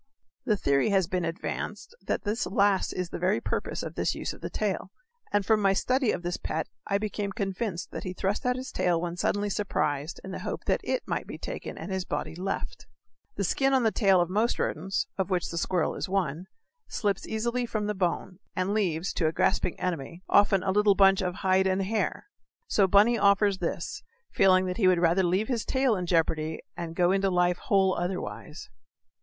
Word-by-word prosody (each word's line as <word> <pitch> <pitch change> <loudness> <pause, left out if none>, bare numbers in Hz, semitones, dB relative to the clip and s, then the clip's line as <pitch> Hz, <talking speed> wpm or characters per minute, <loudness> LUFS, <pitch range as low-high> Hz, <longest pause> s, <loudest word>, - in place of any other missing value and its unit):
The 215 - +2
theory 140 +3 +2
has 195 -3 +3
been 180 +1 -2
advanced 165 - -4
that - - -2
this 215 +2 -1
last 200 0 +2
is 180 -2 -3
the - - -4
very 185 +4 +2
purpose - - -3
of - - -5
this - - -1
use - - -4
of - - -14
the - - -4
tail; - - -2 0.4
and 205 -1 +1
from 220 0 +3
my 195 -1 +4
study 255 +4 +1
of 175 - -4
this 175 0 -2
pet 160 0 -3 0.2
I 200 - +2
became 205 -1 -3
convinced 195 -2 -3
that - - -5
he 185 - -4
thrust 195 +2 -1
out 250 0 +1
his 255 +1 -6
tail 175 -2 +1
when 170 0 -3
suddenly 205 +3 0
surprised 155 -7 -1
in 190 - -7
the - - -5
hope - - -5
that - - +1
it - - -2
might - - -2
be - - -7
taken - - -6
and - - -6
his 190 -1 -1
body - - -4
left. 185 +4 -4 0.5
The - - -1
skin 270 0 +2
on 260 - +3
the 220 - +3
tail 195 -5 +4
of 175 - +2
most 215 +6 +1
rodents 190 +6 -1
(of 190 - 0
which 180 -2 0
the 170 - -4
squirrel 180 0 0
is - - -4
one) 180 -3 -1 0.4
slips 200 -3 -1
easily 235 +3 -1
from 215 -2 -2
the 210 - -1
bone, 185 0 -2 0.2
and 185 +2 0
leaves, 185 -4 0
to 165 - +1
a - - +1
grasping 165 - 0
enemy, 170 0 -4
often 200 -2 +4
a 190 - +1
little 205 0 +4
bunch 195 -1 +5
of 180 -1 -2
"hide 190 0 +4
and 190 +1 +1
hair." 210 - -1 0.4
So 200 -2 +3
Bunny 210 +5 +5
offers 200 -1 +4
this 170 -1 -3 0.3
feeling 185 -1 +5
that 180 0 -3
he 195 - +3
would 185 -1 +5
rather 170 +2 +3
leave 185 +4 +1
his 240 -4 -1
tail 260 -3 +2
in 180 -2 -3
jeopardy 160 -2 +1 0.2
and 165 -1 -6
go 175 +1 +3
into 195 0 +2
life 180 -1 +2
whole 190 -2 +2
otherwise. 180 +1 -4
190 Hz, 210 wpm, -28 LUFS, 175-205 Hz, 0.5 s, bunch